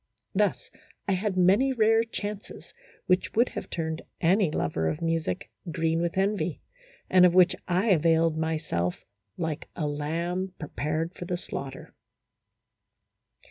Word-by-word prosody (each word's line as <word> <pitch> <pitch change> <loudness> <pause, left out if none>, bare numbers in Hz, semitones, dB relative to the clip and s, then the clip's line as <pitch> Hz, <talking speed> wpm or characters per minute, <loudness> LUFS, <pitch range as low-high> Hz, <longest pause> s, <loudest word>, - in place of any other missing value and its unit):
Thus - - 0 0.4
I - - +1
had 190 0 0
many 200 +9 +4
rare 225 -1 +4
chances 210 -2 -6 0.3
which 185 0 +1
would 235 +3 +4
have - - -6
turned 160 -1 -3 0.2
any 185 +2 +3
lover 80 - -1
of 150 - -3
music 165 +3 -2 0.2
green 165 +1 0
with 170 +1 -2
envy, 200 +2 0 0.5
and 185 -1 +5
of 180 -1 +6
which 185 0 +6
I 185 +5 +1
availed 165 -1 +3
myself 155 - -2 0.3
like 160 -3 -3
a 160 - -2
lamb 170 +6 -2
prepared 155 +2 -3
for 175 - -7
the 175 0 -2
slaughter. 135 -5 -7
170 Hz, 135 wpm, -27 LUFS, 160-190 Hz, 0.5 s, of